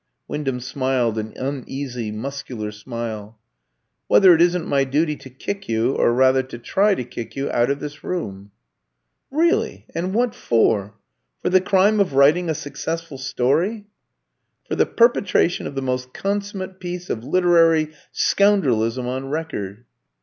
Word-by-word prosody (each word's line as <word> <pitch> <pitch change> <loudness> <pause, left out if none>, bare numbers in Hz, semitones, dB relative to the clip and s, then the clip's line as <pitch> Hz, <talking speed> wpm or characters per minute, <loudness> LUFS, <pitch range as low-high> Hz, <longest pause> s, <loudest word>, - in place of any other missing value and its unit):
Wyndham 135 -4 -2
smiled 130 -3 0
an 110 0 -5
uneasy 130 -3 -4
muscular 115 -2 -5
smile. 110 0 -6 0.7
"Whether 190 -3 +7
it 165 - +3
isn't 175 -1 +3
my 140 -1 +2
duty 150 +3 0
to 130 - -12
kick 195 +9 -6
you, 115 +3 +1
or - - +3
rather 130 +2 +4
to 130 -2 -9
try 195 - +2
to 125 - -3
kick 120 -1 -8
you, 135 0 -2
out 120 +1 +2
of 140 0 0
this 145 0 -8
room." 100 - -4 0.8
"Really; 330 +5 +1
and 180 +4 -2
what 240 0 +2
for? 105 -3 +1 0.5
For - - +1
the 185 0 +5
crime 200 +3 +3
of 185 -9 +1
writing 155 +6 +4
a 160 - 0
successful 145 +1 -5
story?" 145 - 0 0.8
"For - - -3
the - - +2
perpetration 215 -7 +2
of - - -8
the 135 - -2
most 125 0 -3
consummate 195 -1 -3
piece 180 0 -5
of 110 - -3
literary 165 -1 +3 0.2
scoundrelism 130 - +2
on 130 +2 -4
record." 120 -9 -4
140 Hz, 150 wpm, -22 LUFS, 125-180 Hz, 0.8 s, Whether